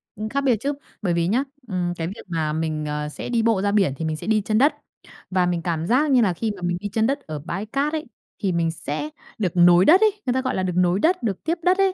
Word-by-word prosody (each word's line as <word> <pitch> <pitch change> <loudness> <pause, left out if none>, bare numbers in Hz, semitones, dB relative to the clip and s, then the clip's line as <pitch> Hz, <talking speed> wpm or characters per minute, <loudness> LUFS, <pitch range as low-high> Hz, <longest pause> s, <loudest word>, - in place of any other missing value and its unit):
Ừm, 215 +1 -4
khác 280 +3 0
biệt 260 -4 +3
chứ. 285 +1 -1 0.3
Bởi 180 -4 0
vì 170 0 +1
nhá, 245 +7 +2 0.2
ừm, 180 -3 -1
cái 165 -1 -3
việc 195 - -7
mà 160 -3 -1
mình, 155 -1 -2
à, 150 0 -3
sẽ 150 - -7
đi 235 -2 +1
bộ 225 -4 +2
ra 200 0 +1
biển 195 -9 +2
thì 160 - -3
mình 155 -1 -1
sẽ 155 - -7
đi 215 -1 +3
chân 215 +2 0
đất. 285 +5 +4 0.6
Và 185 -1 +2
mình 175 -1 -1
cảm 165 -1 -2
giác 280 +5 +3
như 250 -2 +5
là 190 -5 +2
khi 220 +5 -2
mà 185 - -12
mình 175 0 -1
đi 205 - -5
chân 220 +3 +1
đất 280 +2 0
ở 155 - -7
bãi 175 +7 -5
cát 280 +7 -1
ấy, 310 -1 -2 0.4
thì 190 - +2
mình 165 -1 +1
sẽ 150 -1 -4 0.3
được 190 -6 0
nối 175 +1 +6
đất 365 +6 +7
ấy, 430 -1 +5
người 250 - +1
ta 260 - +1
gọi 260 - -2
là 185 - -1
được 180 -2 -1
nối 180 +1 +2
đất, 360 - +2
được 200 -5 -2
tiếp 330 +2 0
đất 365 +1 +3
ấy. 390 -1 +3
195 Hz, 290 wpm, -23 LUFS, 170-250 Hz, 0.6 s, đất